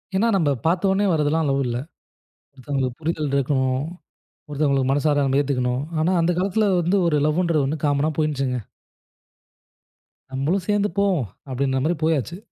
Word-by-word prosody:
ஏனா, 210 +5 +3
நம்ம 160 -6 +2 0.2
பார்த்தோனே 190 +4 +2
வரதெல்லாம் 155 0 +1
லவ் 135 0 +1
இல்ல. 120 - -2 0.8
ஒருத்தவங்களுக்கு 130 -1 -3
புரிதல் 155 -3 -2
இருக்கணும். 130 -1 +1 0.7
ஒருத்தவங்களுக்கு 140 -3 +1
மனசார 145 +1 +2
நம்ம 135 +1 +2
ஏத்துக்கணும். 125 -2 -1 0.2
ஆனா, 170 +4 +2
அந்த 170 +2 +2
காலத்தில 200 +3 +1
வந்து 175 +4 +1
ஒரு 150 -2 +2
லவுன்றது 160 -2 +1
ஒண்ணு 150 +2 -3
காம்மன்னா 145 +2 +1
போயிடுச்சுங்க 135 -5 0 1.7
நம்மளும் 160 +8 -1
சேர்ந்து 205 0 +1
போவோம், 185 - +1 0.2
அப்டின்ற 130 0 0
மாரி 170 +2 +1
போயாச்சு. 160 +1 0
150 Hz, 135 wpm, -22 LUFS, 135-170 Hz, 1.7 s, ஏனா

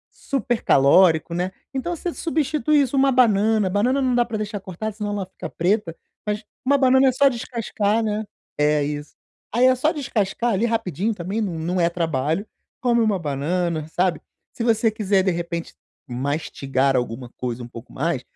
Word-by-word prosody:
super 245 -4 -2
calórico, 160 +4 +4
né, 180 +2 -1 0.2
então 340 +7 -2
você 345 +1 -4
substitui 305 -2 +1
isso, 275 0 0
uma 270 -1 +4
banana, 215 -4 +3
banana 245 +8 +1
não 255 -1 +1
dá 240 0 +3
pra 230 -2 -5
deixar 210 -1 -4
cortada 195 +3 -5
senão 210 0 -4
ela 205 -2 -2
fica 185 - -8
preta, 180 -1 0 0.3
mas 210 +1 -1 0.2
uma 280 +1 +4
banana 265 0 +5
é 255 - +3
só 280 +1 +5
descascar, 230 -3 -1
né, 215 0 -1 0.3
é 150 0 +3
isso. 145 0 -5 0.4
Aí 245 +2 +4
é 260 - +6
só 300 +6 +1
descascar 240 - -1
ali 210 +5 +1
rapidinho 225 -2 -1
também, 190 +4 -3
não 180 -3 -2
é 170 - +3
trabalho, 165 +2 -1 0.4
come 240 -2 +3
uma 215 -3 +2
banana, 160 +2 -2
sabe, 175 +1 0 0.3
se 230 - -4
você 225 -1 +3
quiser 200 -3 +1
de 190 - +2
repente 170 0 -4 0.3
mastigar 135 0 -1
alguma 120 0 -3
coisa 125 -1 -4
um - - -7
pouco 115 -2 -11
mais, - - -1
205 Hz, 175 wpm, -22 LUFS, 165-240 Hz, 0.4 s, é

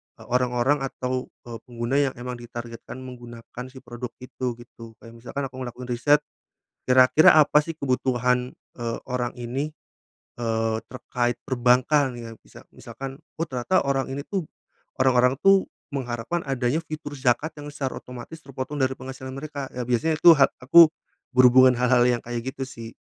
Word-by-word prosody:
eee, - - -15
orang-orang 125 +3 +2
atau, 130 -1 -3 0.2
eee, 115 -1 -8
pengguna 120 +1 -3
yang 140 -2 +1
emang 125 0 -6
ditargetkan 120 +1 -8
menggunakan 120 -1 -9
si 130 0 -14
produk 120 -1 -7
itu 125 -1 -4
gitu. 115 -1 -13
Kayak 115 - -11
misalkan 130 +4 -5
aku 130 - -10
melakukan 125 0 -6
riset, 145 +5 +3 0.6
kira-kira 130 +5 +6
apa 150 -1 +6
sih 165 +2 -4
kebutuhan, 125 -3 0 0.3
eee, 115 -1 -2
orang 125 -1 -2
ini, 130 +6 -3 0.7
eee, 115 -1 0
terkait 120 -1 -2
perbankan 130 +2 +3
ya. 115 -1 -8
Misa - - -15
misalkan, 135 0 -8 0.2
oh 165 - -1
ternyata 130 +8 0
orang 135 -1 0
ini 140 +2 -5
tuh 190 -5 -2 0.5
orang-orang 130 0 +3
tuh 195 0 +5 0.3
mengharapkan 125 +5 -3
adanya 135 +3 0
fitur 155 -2 -7
zakat 135 +4 +1
yang 145 0 -8
secara 140 -2 -4
otomatis 125 +6 -10
terpotong 135 +1 -6
dari 130 0 +2
penghasilan 130 0 -8
mereka. 140 -1 -6
Ya 125 - -2
biasanya 125 +6 +1
itu 175 - +9
ha 140 - +5
aku 165 +5 +8 0.5
berhubungan 130 0 +7
hal-hal 125 0 +4
yang 120 -1 +1
kayak 120 +1 -4
gitu 135 - -4
sih. 115 -3 -9
125 Hz, 155 wpm, -24 LUFS, 120-135 Hz, 0.7 s, itu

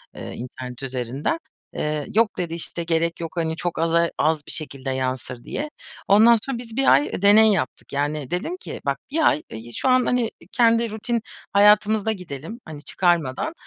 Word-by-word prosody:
eee, - - -7
internet 125 +1 -8
üzerinden. 130 - -2 0.4
Eee, 150 -1 -2
"Yok," 220 -2 +3
dedi, 170 -2 -3
işte, 170 0 -3
"gerek 165 0 0
yok, 165 -1 -4
hani, 160 -1 0
çok 170 -1 -3
aza 165 +1 +2
az 155 +1 +2
bir - - -4
şekilde 140 -4 -4
yansır." 130 -1 -3
diye. 300 +2 -4 0.4
Ondan 225 +4 +7
sonra 270 +1 -4
biz 235 -1 -7
1 270 - +2
ay, 140 +2 +4
eee, 160 - -5
deney 215 +2 +7
yaptık. 160 -10 -2
Yani 145 -1 -2
dedim 310 - -2
ki, - - -8
"Bak, - - 0
bir 315 +1 +3
ay 150 - +2 0.3
şu 265 - 0
an 255 -1 +4
hani 245 -2 +1 0.2
kendi 230 -2 +3
rutin 230 +2 -2 0.3
hayatımızda 210 +1 +5
gidelim 180 - -7
hani 150 -2 -9
çıkarmadan. 170 - 0
170 Hz, 175 wpm, -23 LUFS, 145-220 Hz, 0.4 s, Ondan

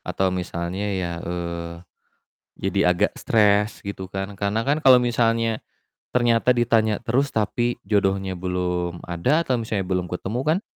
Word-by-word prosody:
Atau 95 -1 -1
misalnya 90 +2 -3
ya, 85 -2 -2
eee, 85 -1 -4 0.9
jadi - - 0
agak 85 - +1
stres, 105 -1 +2
gitu 95 -2 -7
kan. 95 +1 -4
Karena 100 +3 0
kan 145 +2 +3
kalau 130 -2 +8
misalnya 115 -2 +1 0.5
ternyata 120 0 +2
ditanya 115 -3 +2
terus 135 +5 +1
tapi 120 +2 -1
jodohnya 95 -2 +1
belum 90 -1 -2
ada 125 - +1
atau 125 -3 0
misalnya 105 -4 -2
belum 90 -2 -2
ketemu 95 +7 -3
kan 155 +8 +1
100 Hz, 140 wpm, -23 LUFS, 90-115 Hz, 0.9 s, kalau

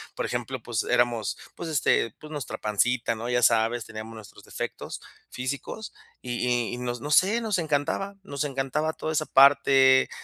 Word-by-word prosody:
por - - -2
ejemplo, - - -4
pues - - -2
éramos, 120 -3 +1 0.2
pues, 170 - -6
este, 135 -7 +2
pues, 155 - -11
nuestra 140 -7 -5
pancita, 115 +3 0
¿no? 115 +2 -5
Ya 120 0 +2
sabes, 115 0 +3
teníamos 110 +1 -8
nuestros 110 -2 -13
defectos - - -6 0.3
físicos 140 - -5 0.3
y 125 - -5
y 120 -1 0
y - - -8
no 125 0 -3
no 145 +5 -5
sé, 200 +9 +4
nos 220 -4 0
encantaba. 160 +5 -1
Nos 140 -6 -3
encantaba 145 +3 -1
toda 160 - -4
esa 155 0 0
parte, 135 -1 +6
130 Hz, 170 wpm, -26 LUFS, 120-150 Hz, 0.3 s, parte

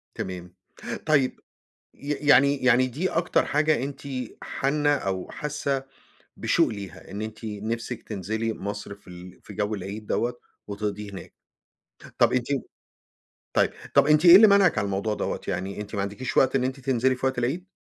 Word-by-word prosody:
تمام. 90 -1 -6 0.5
طيب، 145 -5 +2 0.6
ي 145 +1 -6
يعني 140 -1 +4
يعني 130 +1 +5
دي 155 +10 -2
أكتر 170 +1 +1
حاجة 150 -3 +2
أنتِ 140 0 -6 0.4
حانّة 145 +2 0
أو 95 -7 -3
حاسّة 140 -2 -2 0.5
بشوق - - +2
ليها، 95 -5 -8
إن 100 +2 -5
أنتِ 110 +1 -7
نِفسِك 115 +3 -4
تنزِلي 110 +2 -3
مصر 100 0 -6
في 100 - -27
ال 90 +1 -11
في 105 - -11
جو 105 +1 -1
العيد 100 +2 -7
دوّة، 120 +1 -1 0.3
وتقضِيه 105 0 -4
هناك. 95 - -10 0.9
طَب - - +4
أنتِ 125 -1 0 1.1
طيب، - - +3 0.3
طَب 140 +1 +6
أنتِ 150 +3 +4
إيه 175 +1 +11
اللي 215 +2 +9
مانعِك 200 -4 +5
على 100 - +1
الموضوع 100 +2 -1
دوّة؟ - - -3
يعني، 100 +3 -3
أنتِ 105 +1 -7
ما 100 - 0
عندكيش 105 +6 -4
وقت 130 0 +4
إن 130 - +2
أنتِ 130 +1 -2
تنزِلي 130 -1 +1
في 125 - -4
وقت 130 -1 0
العيد؟ 145 +10 -2
120 Hz, 165 wpm, -25 LUFS, 100-140 Hz, 1.1 s, إيه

